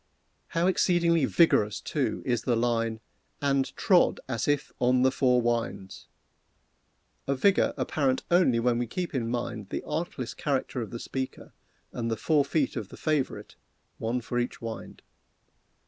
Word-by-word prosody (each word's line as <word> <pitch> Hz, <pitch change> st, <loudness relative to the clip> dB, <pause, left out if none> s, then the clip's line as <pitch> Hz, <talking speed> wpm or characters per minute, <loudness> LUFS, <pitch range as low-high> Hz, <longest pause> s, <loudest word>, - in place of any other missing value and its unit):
How 170 Hz, -, +3 dB
exceedingly 170 Hz, -4 st, +3 dB
vigorous, 110 Hz, -12 st, +3 dB
too, -, -, -2 dB
is 120 Hz, -3 st, +1 dB
the 120 Hz, 0 st, +1 dB
line, 115 Hz, -1 st, 0 dB, 0.4 s
"And 140 Hz, -2 st, +1 dB
trod 180 Hz, -3 st, +3 dB
as 115 Hz, -5 st, -2 dB
if 145 Hz, -1 st, 0 dB
on 125 Hz, +1 st, +3 dB
the 130 Hz, -, +4 dB
four 125 Hz, -2 st, +2 dB
winds!" 115 Hz, -5 st, -2 dB, 1.2 s
A 140 Hz, -, +1 dB
vigor 195 Hz, +9 st, +3 dB
apparent 135 Hz, -4 st, 0 dB
only 170 Hz, -10 st, +4 dB
when 120 Hz, 0 st, +1 dB
we 120 Hz, -, -1 dB
keep 175 Hz, +9 st, -4 dB
in 120 Hz, -4 st, -1 dB
mind 120 Hz, -4 st, -3 dB
the -, -, -4 dB
artless 150 Hz, -6 st, -3 dB
character 135 Hz, -3 st, -2 dB
of 110 Hz, -, -5 dB
the 120 Hz, -, -6 dB
speaker 130 Hz, +2 st, -5 dB, 0.4 s
and 115 Hz, -1 st, -3 dB
the 115 Hz, -, -1 dB
four 150 Hz, +2 st, +2 dB
feet 140 Hz, -1 st, 0 dB
of -, -, -4 dB
the -, -, -11 dB
favorite, 155 Hz, -4 st, -2 dB, 0.4 s
one 120 Hz, +3 st, -1 dB
for 120 Hz, +1 st, -2 dB
each 120 Hz, -, -3 dB
wind. 115 Hz, -1 st, -7 dB
125 Hz, 155 wpm, -28 LUFS, 115-145 Hz, 1.2 s, the